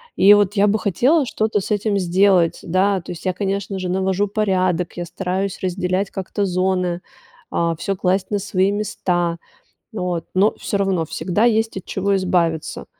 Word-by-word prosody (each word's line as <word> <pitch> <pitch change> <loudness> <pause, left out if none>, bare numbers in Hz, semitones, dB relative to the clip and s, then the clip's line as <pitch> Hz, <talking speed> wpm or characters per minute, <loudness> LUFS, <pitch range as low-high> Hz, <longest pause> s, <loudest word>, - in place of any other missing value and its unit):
И 200 +2 +7
вот 205 -1 +2
я 205 -1 +3
бы 210 +1 +2
хотела 260 - +2
что-то 215 -3 0
с 195 - -6
этим 205 0 +1
сделать. 180 -2 +3
Да, 190 +2 +1
то - - -9
есть 175 - -9
я, 185 - +1
конечно 195 0 -3
же, 185 -1 -3
навожу 190 +2 0
порядок, 185 -4 0
я 175 - -3
стараюсь 190 +2 -3
разделять 185 +1 -1
как-то 195 +2 -3
зоны, 185 -1 0 0.5
а, 170 -1 0
всё 195 +4 -2
класть 185 +1 0
на 205 - +1
свои 195 -1 +1
места, 175 -4 -1 0.6
вот, 180 -5 -3
но 200 +3 +3
всё - - -2
равно 190 -4 +1
всегда 190 +6 -1
есть 225 -2 +2
от - - -11
чего 195 +1 0
избавиться. 175 -4 -1
190 Hz, 170 wpm, -20 LUFS, 180-200 Hz, 0.6 s, И